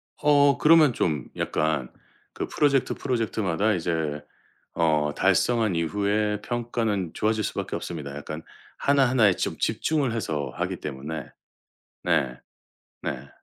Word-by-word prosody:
어 145 -2 +4
그러면 155 -4 +6
좀 75 - -1
약간 75 -5 -1 0.4
그 - - -4
프로젝트, 140 -3 +2
프로젝트마다 110 -5 0
이제 80 -4 -2 0.5
어 75 -3 +2
달성한 105 +2 +2
이후에 105 +4 0
평가는 115 -7 -2
좋아질 110 0 0
수 - - -2
밖에 - - -3
없습니다, 75 -5 -5
약간 75 +2 -6 0.3
하나하나에 130 -7 +4
좀 - - -3
집중을 145 -6 0
해서 80 -10 -2
하기 - - -2
때문에. 75 +2 -6 0.8
네. 60 -1 +1 0.6
네. 65 +2 -4
100 Hz, 270 characters per minute, -25 LUFS, 80-120 Hz, 0.8 s, 그러면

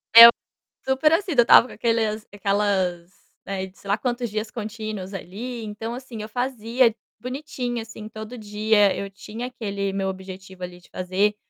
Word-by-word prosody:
Eu, 230 0 +14 0.6
super 265 +3 +3
assim, 380 +2 +1
eu 240 - +7
estava 235 +1 +7
com - - -11
aqueles 225 -2 0
aquelas, 195 -3 0 0.3
né, 190 -1 -4
sei 200 - -16
lá 200 +1 +2
quantos 240 +1 -2
dias 215 +1 -3
contínuos 215 -3 -5
ali. 225 +6 -6
Então, 220 +2 -5
assim, 245 -3 -7
eu 215 - -7
fazia 245 -1 +1 0.2
bonitinho, 250 -2 -4
assim, 220 -1 -9
todo 220 +2 -8
dia, 210 -1 +2
eu 200 - -4
tinha 215 +5 -7
aquele 200 -5 -3
meu 195 -1 -1
objetivo 190 0 -9
ali 180 0 -7
de 175 - -22
fazer, 190 +3 0
215 Hz, 160 wpm, -24 LUFS, 195-240 Hz, 0.6 s, Eu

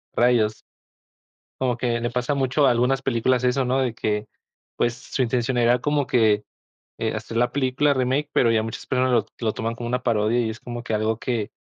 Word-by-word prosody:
Rayos. 115 -3 +2 0.9
Como 125 -2 0
que 120 -1 -1
le 120 - -1
pasa 125 +3 -1
mucho, 140 +1 +2
a - - +5
algunas 125 +3 +1
películas, 125 0 +1
eso 125 +2 +2
¿no? 130 +2 +1
De 130 -3 0
que, 105 -2 -2 0.5
pues, 120 0 +1
su 125 +2 -4
intención 125 +1 0
era 120 +1 +3
como 145 +2 0
que, 110 -3 +3 0.6
eh, - - -1
hacer 115 - -6
la 120 +1 +2
película 140 +2 +1
remake, 135 +3 0
pero 115 - +3
ya 110 -1 +2
muchas 115 0 -6
personas 130 -1 +1
lo-lo 115 0 0
toman 115 +2 -3
como 120 0 -6
una 125 +1 -1
parodia. 115 0 +1
Y 115 -2 -1
es 110 - -8
como 120 -1 -6
que 115 -2 -3
algo 110 +1 0
que 115 -3 -2
120 Hz, 200 wpm, -23 LUFS, 115-130 Hz, 0.9 s, a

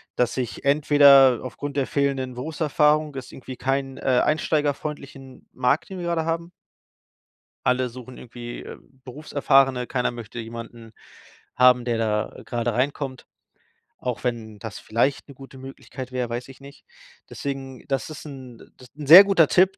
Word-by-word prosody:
dass 125 -1 0
ich 125 +1 -4
entweder 140 -3 +6
aufgrund 140 +2 -6
der 135 - +1
fehlenden 135 -2 -1
Berufserfahrung 150 +2 +1
das 135 -2 -6
ist - - -14
irgendwie 130 -1 -10
kein, 135 0 -2
äh, - - -10 0.2
einsteigerfreundlichen 145 -3 -3
Markt, 130 +4 0
den 190 -1 -7
wir 175 - -4
grade 165 -2 -1
haben. 165 +1 -3 1.1
Alle 125 0 +2
suchen 125 +1 -11
irgendwie, 120 0 -9
äh, - - -9 0.3
Berufserfahrene. 135 -2 +1
Keiner 125 -2 -1
möchte 120 -1 -10
jemanden 115 0 -9 0.6
haben, 125 -1 +5
der 120 -2 0
da, 105 -1 -1
äh, - - -11
grade 120 -1 -2
reinkommt, 130 +1 -2 0.7
auch 125 -5 -4
wenn 115 -4 -4
das 110 -1 -7
vielleicht 120 +5 -1
'ne 140 - -12
gute 135 0 -13
Möglichkeit 130 -1 -9
wäre, 125 -2 -2
weiß 120 +1 -5
ich 135 - -13
nicht. 140 +1 -14 0.4
Deswegen 135 -2 -6
das 135 +1 -2
ist 155 - -9
'n 130 -5 -11
das 125 - -16
'n 150 -2 -8
sehr 175 +7 +12
guter 195 -6 +4
Tipp, 185 +4 +3
135 Hz, 160 wpm, -23 LUFS, 125-145 Hz, 1.1 s, sehr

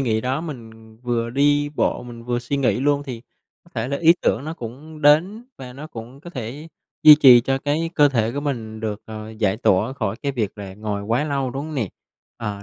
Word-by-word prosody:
nghĩ 110 -5 +1
đó, 130 +5 -1
mình 115 -8 -10
vừa 120 -1 -1
đi 145 +3 +2
bộ, - - 0
mình 120 -1 -10
vừa 120 0 -1
suy 120 +4 -3
nghĩ 135 -2 +1
luôn 145 +1 +2
thì 125 -5 -7 0.4
có 175 - -22
thể 115 +1 -2
là 140 - -1
ý 165 +2 +5
tưởng 125 - +1
nó 160 +1 -5
cũng 150 +5 -9
đến 175 +10 +4
và 125 -1 -9
nó 145 +4 -9
cũng 120 0 -10
có 175 - -10
thể 135 +3 -7 0.3
duy 155 -1 +11
trì 130 -5 +8
cho 135 +3 -1
cái 150 +4 -1
cơ 145 -1 +5
thể 115 -4 0
của 140 - -3
mình 115 -7 -4
được, 110 -1 -4
ờ, 110 0 -8
giải 110 -3 0
tỏa 110 +2 +2
khỏi 110 -6 -3
cái 140 -1 -1
việc 110 -5 -3
là 95 -2 -7
ngồi 105 -1 -4
quá 115 +8 0
lâu, 140 -3 -1
đúng 135 +3 -4
hông 155 - -7
nè? 115 -8 -1 0.5
Ờ, 105 -3 -5
125 Hz, 230 wpm, -22 LUFS, 110-145 Hz, 0.5 s, duy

